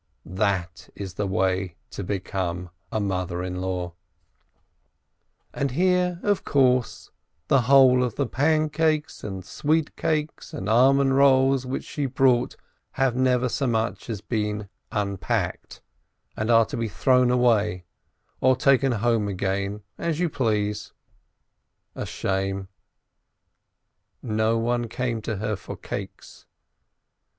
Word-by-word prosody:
That 95 Hz, -2 st, -2 dB
is 95 Hz, -3 st, -6 dB
the 100 Hz, +2 st, -2 dB
way 95 Hz, -1 st, 0 dB, 0.2 s
to 100 Hz, -, -5 dB
become 90 Hz, -2 st, -3 dB, 0.2 s
a 110 Hz, -, -1 dB
mother 90 Hz, -3 st, -2 dB
in 90 Hz, 0 st, -4 dB
law! 90 Hz, -2 st, -3 dB, 1.6 s
And 140 Hz, -, -1 dB
here, 180 Hz, +4 st, +1 dB
of 205 Hz, -2 st, +1 dB
course, 130 Hz, -4 st, +1 dB, 0.4 s
the 135 Hz, -, +5 dB
whole 130 Hz, -2 st, +7 dB
of 120 Hz, -4 st, -2 dB
the 140 Hz, -, 0 dB
pancakes 155 Hz, +3 st, +1 dB
and 95 Hz, -3 st, -6 dB
sweet 155 Hz, +1 st, 0 dB
cakes 155 Hz, -1 st, -2 dB
and 95 Hz, -, -5 dB
almond 135 Hz, +4 st, +4 dB
rolls 135 Hz, -1 st, +4 dB
which 130 Hz, -, -3 dB
she 145 Hz, -2 st, -3 dB
brought 125 Hz, -1 st, +2 dB, 0.4 s
have 135 Hz, -2 st, +1 dB
never 125 Hz, -1 st, +2 dB
so 135 Hz, +2 st, -1 dB
much 115 Hz, 0 st, -1 dB
as 105 Hz, -4 st, -4 dB
been 105 Hz, -3 st, -2 dB, 0.2 s
unpacked, 100 Hz, -4 st, -2 dB, 0.5 s
and 110 Hz, +2 st, -2 dB
are 115 Hz, -1 st, +6 dB
to -, -, -6 dB
be 115 Hz, -1 st, -1 dB
thrown 125 Hz, +6 st, +3 dB
away 110 Hz, -7 st, +2 dB, 0.5 s
or 130 Hz, 0 st, +4 dB
taken 135 Hz, 0 st, +3 dB
home 115 Hz, -1 st, +1 dB
again, 100 Hz, +1 st, -2 dB, 0.2 s
as 165 Hz, -2 st, -1 dB
you 175 Hz, -1 st, +1 dB
please! 105 Hz, -6 st, -1 dB, 1.0 s
A -, -, -5 dB
shame! 95 Hz, 0 st, -2 dB, 1.5 s
No 110 Hz, 0 st, +1 dB
one 120 Hz, +1 st, 0 dB
came 120 Hz, -2 st, -2 dB
to 110 Hz, 0 st, -3 dB
her 105 Hz, +1 st, -2 dB
for -, -, -8 dB
cakes. -, -, -8 dB
115 Hz, 125 wpm, -25 LUFS, 100-135 Hz, 1.6 s, whole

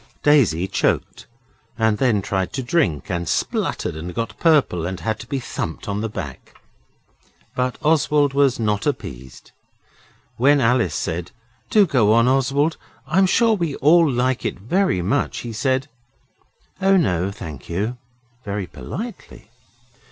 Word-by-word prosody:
Daisy 110 Hz, -, +4 dB
choked -, -, -1 dB, 0.5 s
and 110 Hz, -2 st, +1 dB
then 115 Hz, -7 st, +2 dB
tried 95 Hz, -1 st, -2 dB
to 130 Hz, -, -3 dB
drink, 120 Hz, -, 0 dB
and 85 Hz, -2 st, -2 dB
spluttered -, -, -1 dB
and 85 Hz, +3 st, -7 dB
got 115 Hz, 0 st, -3 dB
purple, 150 Hz, -, +3 dB
and 95 Hz, 0 st, -5 dB
had 110 Hz, 0 st, -2 dB
to 115 Hz, -, -9 dB
be 140 Hz, 0 st, -2 dB
thumped 85 Hz, -9 st, -5 dB
on 100 Hz, 0 st, -2 dB
the 115 Hz, -, -2 dB
back. 70 Hz, -9 st, -8 dB, 1.0 s
But 125 Hz, 0 st, -1 dB
Oswald 150 Hz, -2 st, +3 dB
was 140 Hz, -3 st, +2 dB
not 105 Hz, -2 st, 0 dB
appeased. 65 Hz, +1 st, -6 dB, 0.9 s
When 140 Hz, +4 st, +4 dB
Alice 120 Hz, -, +2 dB
said, 85 Hz, +1 st, -3 dB, 0.4 s
'Do 210 Hz, -2 st, +5 dB
go 115 Hz, -, +3 dB
on, 115 Hz, +1 st, +4 dB
Oswald. 140 Hz, +4 st, +1 dB, 0.3 s
I'm 190 Hz, +2 st, +3 dB
sure 230 Hz, +4 st, +3 dB
we 170 Hz, -8 st, -1 dB
all 165 Hz, +2 st, +5 dB
like 125 Hz, +1 st, 0 dB
it -, -, -2 dB
very 120 Hz, -, 0 dB
much,' 140 Hz, +11 st, -1 dB
he 120 Hz, -1 st, -6 dB
said 130 Hz, +4 st, 0 dB, 0.9 s
'Oh, 195 Hz, 0 st, +4 dB
no, 90 Hz, -, +1 dB
thank 80 Hz, -9 st, -9 dB
you,' 105 Hz, +8 st, -2 dB, 0.5 s
very 100 Hz, -1 st, -3 dB
politely. 195 Hz, -, -8 dB
120 Hz, 145 wpm, -21 LUFS, 95-145 Hz, 1.0 s, Do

